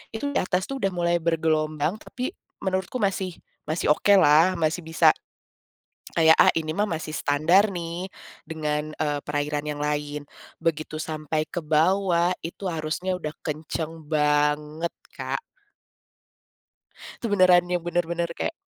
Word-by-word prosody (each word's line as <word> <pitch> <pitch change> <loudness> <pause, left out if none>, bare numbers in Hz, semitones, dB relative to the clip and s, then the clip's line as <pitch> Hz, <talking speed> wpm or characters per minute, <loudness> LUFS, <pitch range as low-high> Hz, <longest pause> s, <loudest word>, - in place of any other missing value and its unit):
itu 285 +5 -2
di - - +1
atas 185 +1 0
tuh 275 - -4
udah 195 -4 0
mulai 175 -1 +1
bergelombang 155 0 +1
tapi 255 +7 -5 0.3
menurutku 190 +5 -1
masih 195 -2 0 0.3
masih 155 +3 -2
okelah 180 -1 +5
masih 160 +2 0
bisa 160 0 +5 1.0
kayak, 160 -1 +6
"Ah, - - +7
ini 155 -1 -1
mah 210 +1 +1
masih 160 -1 -4
standar 165 +9 +3
nih, 175 +1 -4 0.4
dengan, 155 -1 -2
eee, 145 -2 0
perairan 145 0 -1
yang 145 -1 -3
lain." 150 0 -2 0.4
Begitu 155 -1 -2
sampai 155 -1 -2
ke 175 - -4
bawah 170 +3 +2
itu 180 +3 -5
arusnya 165 +4 -2
udah 150 -2 -4
kenceng 155 +1 -5
banget, 150 +1 +1 0.2
Kak. - - -3 1.8
Itu - - -1
beneran 185 -4 +5
yang 175 -1 -1
benar-benar 170 0 -1
kayak 245 - -3
165 Hz, 130 wpm, -25 LUFS, 155-180 Hz, 1.8 s, Ah